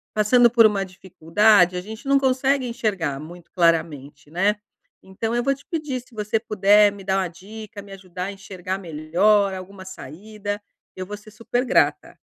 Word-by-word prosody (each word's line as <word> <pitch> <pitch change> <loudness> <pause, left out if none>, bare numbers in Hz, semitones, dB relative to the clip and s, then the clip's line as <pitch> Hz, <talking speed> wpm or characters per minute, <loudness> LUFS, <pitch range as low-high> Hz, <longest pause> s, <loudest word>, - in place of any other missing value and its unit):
passando 235 +3 +5
por 230 -1 +5
uma 200 -2 +2
dificuldade 185 +1 +2
a 180 - -3
gente 220 +7 -10
não 275 0 +4
consegue 265 0 +1
enxergar 195 - -2
muito 170 +2 -12
claramente, 150 -4 0
né? 195 +5 +1 0.5
Então 225 +5 -4
eu 240 - 0
vou 275 +2 +2
te 275 - -14
pedir 300 -6 -3
se 250 - -24
você 210 +1 -1
puder 210 -1 +4
me 200 -1 -11
dar 190 0 0
uma 185 - -1
dica, 205 +4 -11
me 200 0 -15
ajudar 185 -2 -7
a 195 - -4
enxergar 190 -1 -6
melhor, 190 +4 +1
alguma 190 +1 -9
saída, 205 +5 -7 0.3
eu 185 - -6
vou 205 +2 -7
ser 215 +1 -16
super 230 +4 -2
grata. - - +1
200 Hz, 175 wpm, -22 LUFS, 180-220 Hz, 0.5 s, passando